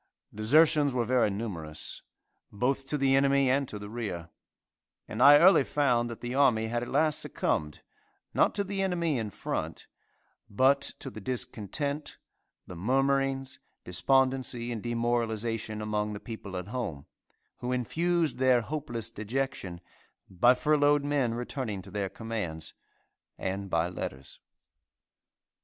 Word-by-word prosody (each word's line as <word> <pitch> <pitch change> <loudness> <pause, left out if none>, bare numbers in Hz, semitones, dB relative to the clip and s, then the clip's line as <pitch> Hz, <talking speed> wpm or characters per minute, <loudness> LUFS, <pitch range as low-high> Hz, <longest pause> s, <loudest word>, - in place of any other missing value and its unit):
Desertions 145 +6 +4
were 125 -2 0
very 125 -2 +3
numerous, 95 -7 -4 0.5
both 135 +5 -1
to 150 - -1
the 135 -1 +3
enemy 135 -1 +4
and 140 0 +1
to 105 - -6
the 105 0 -8
rear, 100 -7 -5 0.8
and 110 - -4
I 145 +2 +10
early 175 -2 +7
found 125 -5 +1
that 115 - -8
the 120 0 -4
army 120 -5 +3
had 120 +1 -1
at 120 - -5
last 150 +2 +2
succumbed, 75 -1 -2 0.5
not - - +3
to 200 - +1
the 195 0 -3
enemy 170 -7 0
in 110 -2 -3
front, - - -4 0.6
but 130 +6 +4 0.2
to 135 - -7
the 110 - -9
discontent, 130 +5 -3 0.5
the 90 - -9
murmurings, 135 +5 0 0.2
despondency 130 +4 +1
and 115 -3 -4
demoralization 115 -2 -1
among 105 0 -1
the 100 - -6
people 100 -5 -7
at 90 +2 -6
home, 105 - -4 0.5
who 125 - -4
infused 160 +5 0
their 130 -2 +4
hopeless 120 -4 -4
dejection, 110 -5 -3 0.5
by 120 +7 +4
furloughed 145 0 +3
men 135 -5 +1
returning 120 -4 -4
to 95 - -12
their 100 -1 -2
commands, 105 -9 -5 0.6
and 95 +1 -3
by 85 -1 +1
letters. 70 -6 -7
120 Hz, 135 wpm, -29 LUFS, 105-135 Hz, 0.8 s, I